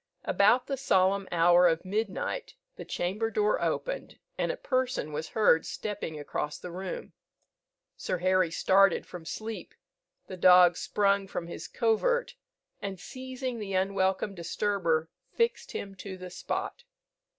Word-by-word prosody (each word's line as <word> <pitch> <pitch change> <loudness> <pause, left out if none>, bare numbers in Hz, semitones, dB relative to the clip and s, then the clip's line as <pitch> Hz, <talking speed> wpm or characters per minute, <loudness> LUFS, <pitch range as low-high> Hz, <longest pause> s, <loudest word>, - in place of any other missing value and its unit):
About 225 +5 +4
the 275 - -3
solemn 195 -6 +2
hour 175 +1 +5
of 165 +1 0
midnight 215 - -3 0.2
the - - -8
chamber 205 +6 -2
door 210 -1 +1
opened, - - -2 0.2
and - - 0
a - - -6
person 255 - -1
was 155 +2 -4
heard 210 -7 +4
stepping 200 -7 -5
across 150 0 -3
the 180 - -8
room. 185 +1 -6 0.8
Sir - - -2
Harry 185 0 +2
started 195 +2 +3
from 175 -2 -10
sleep; 220 +5 -6 0.5
the 185 - -8
dog 180 -1 +7
sprung 200 +1 +1
from 175 - -4
his 170 - -7
covert, 255 - +1 0.5
and 195 -2 -5
seizing 255 0 -5
the 200 -2 -5
unwelcome 190 +1 +1
disturber, 170 -3 -1 0.2
fixed 465 0 0
him 200 -1 -5
to 190 0 -8
the 180 -1 -9
spot. 485 - -4
195 Hz, 140 wpm, -29 LUFS, 180-220 Hz, 0.8 s, dog